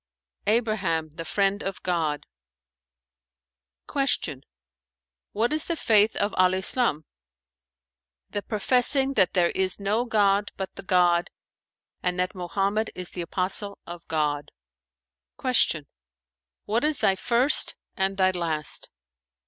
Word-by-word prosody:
"Abraham, 210 -8 +1
the 165 +2 -7
Friend 195 +3 0
of 195 -1 -5
God." 160 -5 -1 1.6
Q 250 - -1 0.9
"What 230 +7 0
is 310 - +2
the 335 - -1
Faith 215 -6 +3
of 205 0 0
Al 185 0 +4
Islam?" 190 - +1 1.3
"The 205 - -2
professing 255 +6 +1
that 190 -8 +3
there 175 -2 +3
is 190 0 0
no 210 +4 0
god 205 -3 +2
but 190 -1 -5
the - - -8
God 175 -2 +2 0.7
and 180 0 -1
that 180 +2 0
Mohammed 195 +4 -1
is 180 -1 -6
the 180 - -5
apostle 190 +4 -1
of 175 0 -10
God." 150 -2 -1 0.9
Q 200 - +2 0.8
"What 225 +5 0
is 300 -1 +2
thy 195 - +3
first 240 +8 +3 0.2
and 195 0 -1
thy 185 -1 +3
last?" 165 -4 -3
195 Hz, 120 wpm, -25 LUFS, 175-220 Hz, 1.6 s, Al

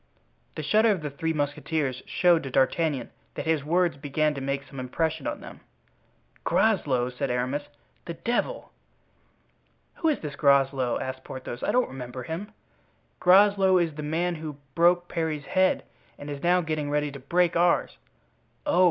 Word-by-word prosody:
The 155 - -4
shudder 215 +8 +4
of 190 -7 0
the 150 - -3
three 160 +4 -2
musketeers 145 -2 -2
showed 175 -2 +3
to 135 - -6
D'Artagnan 135 0 +1 0.2
that - - -4
his 160 -3 +1
words 170 0 +1
began 150 +2 0
to 140 - -6
make 140 +1 -2
some 135 - -10
impression 155 +4 -2
on - - -4
them. - - -11 0.8
"Groslow!" 135 - +2
said 130 +2 -3
Aramis; 130 +4 -1 0.4
"the 170 - -5
devil! 245 - -2 1.3
"Who 325 - 0
is 300 - 0
this 150 -3 -6
Groslow?" 135 -3 +3
asked 130 0 -5
Porthos. 130 -2 -7
"I - - 0
don't 250 0 +2
remember 125 -1 -7
him." 175 - -5 0.7
"Groslow 195 0 +5
is 170 -3 +1
the 150 - -6
man 165 +4 -1
who 155 -3 -6 0.2
broke 175 +2 +3
Parry's 160 -3 -2
head 185 0 +2 0.3
and 145 0 -7
is 140 -1 -6
now 180 +1 +3
getting 155 -3 -2
ready 150 0 0
to 140 - -9
break 170 +6 +1
ours." 175 0 +2 0.7
"Oh! 290 - +2
155 Hz, 160 wpm, -26 LUFS, 140-175 Hz, 1.3 s, Groslow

